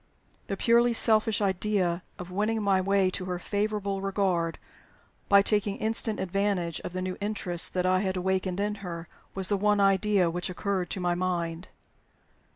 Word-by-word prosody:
The 195 - -3
purely 235 +2 +4
selfish 220 -1 +3
idea 190 -2 0 0.2
of 180 0 -8
winning 215 +3 0
my 195 -2 +3
way 195 0 +2
to 185 - -4
her 180 -1 -3
favorable 200 0 -2
regard 190 -4 0 0.7
by 200 0 +7
taking 205 -1 +1
instant 220 0 -1
advantage 190 -3 -1
of 180 - -7
the 185 0 -3
new 185 0 -4
interest 190 -5 -1
that 180 0 +1
I 185 0 +3
had 190 -1 -1
awakened 185 0 -1
in 205 +1 0
her 170 -3 -6 0.3
was 190 -1 +1
the 205 - +2
one 205 +1 +2
idea 195 -1 +3
which 175 +2 -3
occurred 185 0 -2
to - - -3
my 175 -1 +1
mind. 175 -1 -2
195 Hz, 165 wpm, -28 LUFS, 180-205 Hz, 0.7 s, by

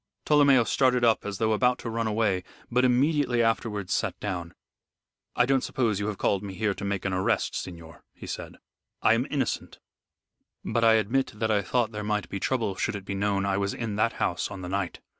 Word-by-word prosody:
Tolomeo 140 -4 +5
started 125 +3 +2
up 115 -3 +3
as 100 -1 -4
though 110 +1 +1
about 125 +3 +2
to - - -8
run 115 0 -1
away, 105 -4 +1 0.3
but 125 +1 +3
immediately 130 -1 +3
afterwards 105 -4 -1
sat - - -1
down. 90 -4 -4 0.8
"I 120 - +4
don't 135 0 +2
suppose 110 -6 0
you 100 - -2
have 105 -2 -3
called 100 - +1
me 100 -2 -7
here 105 0 0
to 100 - -9
make 100 -1 -2
an 95 - 0
arrest, 95 0 0
signor," 85 -2 -7
he - - -12
said. - - -6 0.5
"I - - +6
am 120 +4 0
innocent, 135 -5 -2 0.9
but 115 - 0
I 115 -1 +6
admit 115 +5 +1
that 110 +1 -1
I 105 -1 +3
thought 115 +4 0
there 105 -1 -5
might 105 0 -1
be 100 - -4
trouble 115 -3 0
should - - -1
it 100 -2 -7
be 100 - -4
known 100 0 0
I 100 -1 +1
was 100 0 -1
in 110 -4 -3
that 115 +2 +2
house - - -1
on 95 - -7
the 90 - -5
night. 95 -1 -3
110 Hz, 215 wpm, -27 LUFS, 100-120 Hz, 0.9 s, I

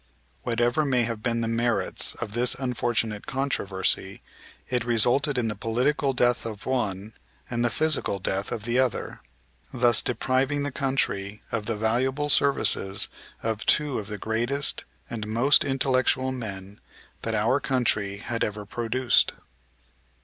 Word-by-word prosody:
Whatever 120 +5 +1
may 130 -4 +2
have 115 -2 -3
been 115 0 -1
the 115 - -1
merits 115 +1 0
of 115 -3 -5
this 120 +2 +2
unfortunate 120 -4 -1
controversy, 100 -8 -1 0.4
it 125 -2 0
resulted 120 +5 +2
in 120 -2 +1
the 105 - -2
political 125 +7 0
death 120 -1 +2
of 110 -3 -7
one 110 -5 -2 0.4
and 120 0 0
the 120 - +2
physical 155 -10 0
death 95 +1 -2
of 105 - -4
the 120 +3 +1
other; 130 -3 -1 0.5
thus 120 -3 +3
depriving 130 +4 0
the 145 - -2
country 105 -7 -2
of 110 -2 -3
the 115 -2 -1
valuable 130 +7 0
services 115 -8 +3 0.3
of 110 -2 -2
two 150 -5 +2
of 105 - -7
the 105 0 -5
greatest 120 +7 +1 0.2
and 110 -2 -5
most 120 +6 +4
intellectual 130 -1 +2
men 100 -5 -7 0.4
that 115 -1 -1
our 115 +6 +2
country 110 -8 0
had 115 +3 -3
ever 105 0 -3
produced. 120 +3 +1
120 Hz, 140 wpm, -26 LUFS, 110-130 Hz, 0.5 s, most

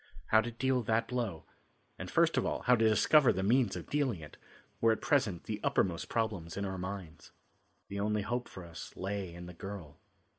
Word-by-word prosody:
How 110 - +6
to 115 - -4
deal 130 +2 +1
that 115 +1 +1
blow, 115 -10 -2 0.5
and - - -5
first - - +3
of - - +2
all, - - -2
how 125 - +5
to 110 -1 +4
discover 135 +6 +5
the 95 -1 -1
means 115 -1 +3
of - - -6
dealing 140 - 0
it, 75 -1 -11 0.5
were 115 - +5
at 110 - 0
present 105 - +1
the 105 -1 -4
uppermost 85 -3 +1
problems 105 -8 -2
in 100 - -1
our 95 -1 -4
minds. 90 -4 -7 0.6
The 100 - -5
only 105 0 0
hope 120 +3 -2
for 95 - -9
us 85 -1 -9
lay 95 -1 -3
in 85 +1 -9
the 90 - -9
girl. 85 -5 -8
100 Hz, 200 wpm, -32 LUFS, 90-115 Hz, 0.6 s, How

